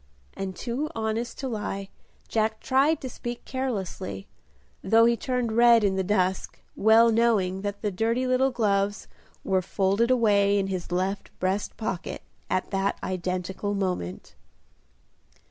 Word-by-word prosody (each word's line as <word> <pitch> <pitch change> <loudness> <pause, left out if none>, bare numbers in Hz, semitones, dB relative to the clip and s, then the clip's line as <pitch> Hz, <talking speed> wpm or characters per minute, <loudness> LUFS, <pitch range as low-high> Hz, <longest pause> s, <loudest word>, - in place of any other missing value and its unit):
and 190 -1 -4
too 260 +6 -3
honest 225 +2 -2
to 270 - -4
lie, 210 -4 -4 0.4
Jack 220 0 0
tried 280 +4 +2
to 260 - -6
speak 240 -1 -6
carelessly, 195 - -4 0.6
though 225 +4 +5
he 235 0 +4
turned 250 0 -2
red 235 0 +6
in 195 -2 +2
the 190 - 0
dusk, 185 -1 0 0.2
well 225 +2 +5
knowing 215 -5 +2
that 205 +1 -5
the 210 - 0
dirty 230 +6 0
little 255 +1 +3
gloves 205 -4 0 0.4
were 190 -1 +1
folded 195 +5 +1
away 205 -5 +3
in 195 - +1
his 185 -3 -4
left 190 +3 -1
breast 190 +2 -2
pocket 195 -5 -4 0.3
at 185 - -1
that 195 0 0
identical 185 +2 -3
moment. 180 - -3
205 Hz, 140 wpm, -26 LUFS, 190-235 Hz, 0.6 s, red